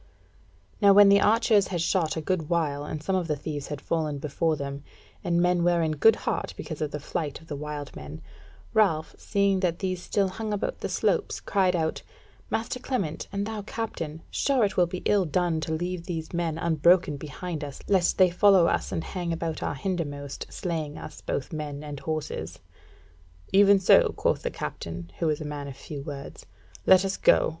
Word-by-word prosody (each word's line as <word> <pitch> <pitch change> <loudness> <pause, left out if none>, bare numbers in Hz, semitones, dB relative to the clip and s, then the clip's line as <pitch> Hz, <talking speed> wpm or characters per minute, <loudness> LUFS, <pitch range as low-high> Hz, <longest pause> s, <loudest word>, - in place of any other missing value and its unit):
Now 200 -1 +7
when 205 0 +8
the 200 0 +6
archers 215 -2 +4
had 175 - -2
shot 165 -1 +1
a - - -1
good 160 -1 -1
while, 150 -4 0
and 150 0 -5
some 190 +3 0
of 180 -3 0
the 150 - 0
thieves 145 0 -5
had 145 - -5
fallen 155 -1 -1
before 155 +3 0
them, 140 -1 -5 0.4
and 170 0 +1
men 180 0 +3
were 175 -1 +3
in 160 - +1
good 210 +9 +5
heart - - -2
because 155 -2 -6
of 155 - 0
the 150 - -5
flight 145 0 -4
of 160 - -17
the 150 - -5
wild 145 0 -6
men, 75 +2 -8 0.5
Ralph, 185 -8 +2
seeing 200 -2 +1
that 175 -3 0
these 185 -2 -2
still 200 0 +1
hung 215 +3 -4
about 205 - -2
the - - -3
slopes, - - 0
cried 190 -2 +1
out: 160 -2 -1 0.5
"Master 230 +3 -2
Clement, 200 - -3
and 200 0 -2
thou 220 -1 -4
Captain, 165 -8 -5
sure 265 -6 +2
it 195 - -3
will 175 -1 +4
be 180 +1 -6
ill 205 -2 +4
done 170 0 0
to 160 - -3
leave 175 +2 -3
these 165 -2 -4
men 170 -2 -1
unbroken 170 0 +3
behind 155 +3 -6
us, 140 -2 -7
lest 190 -3 +2
they 185 -2 +5
follow 190 -1 +5
us - - 0
and 165 - -2
hang 175 -3 -4
about 165 -1 -3
our - - -2
hindermost, 145 -4 -4
slaying 160 -5 -4
us 150 - -9
both 140 - -3
men 150 -2 -5
and 145 -2 -6
horses." 145 - -4 1.0
"Even 200 0 +7
so," 190 - +6
quoth - - +1
the - - -2
captain, 85 +1 -6
who 165 - +1
was 150 -1 0
a 155 - -5
man 145 -1 -5
of 135 -1 -8
few 145 -2 -7
words, 140 -1 -8 0.4
"let 190 0 +7
us 195 0 -2
go. - - +4
165 Hz, 200 wpm, -27 LUFS, 150-190 Hz, 1.0 s, when